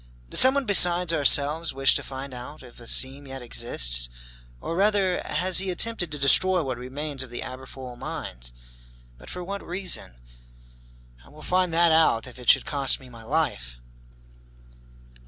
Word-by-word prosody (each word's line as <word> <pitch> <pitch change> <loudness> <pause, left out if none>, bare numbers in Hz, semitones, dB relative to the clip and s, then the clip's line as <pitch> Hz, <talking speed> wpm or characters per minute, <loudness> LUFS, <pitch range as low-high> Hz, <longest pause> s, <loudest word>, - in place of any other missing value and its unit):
Does - - +4
someone 265 +1 +7
besides 180 -4 +4
ourselves 150 +1 +2
wish 135 0 +2
to - - -3
find 135 0 -9
out 125 +4 -11
if 125 -1 -16
a 120 - -11
seam 135 +3 0
yet 135 -1 -9
exists? - - +2 0.5
Or, 165 - -6
rather, 195 -1 0
has 185 0 +2
he 190 0 -1
attempted 180 -2 0
to 150 - -5
destroy 175 +6 +4
what 130 -3 -5
remains 140 +2 -6
of 130 - -6
the 120 - -7
Aberfoyle 130 -1 -10
mines? - - -7 0.7
But - - -13
for 180 - -7
what 200 +3 -7
reason? 180 - -2 1.1
I - - -19
will 155 +1 -15
find 185 -1 0
that 170 0 +3
out, 160 -8 +2
if 125 -1 -12
it 125 - -3
should - - +4
cost 140 -3 0
me 130 - -16
my 115 -2 -13
life!" 110 - -3
145 Hz, 165 wpm, -24 LUFS, 125-180 Hz, 1.1 s, someone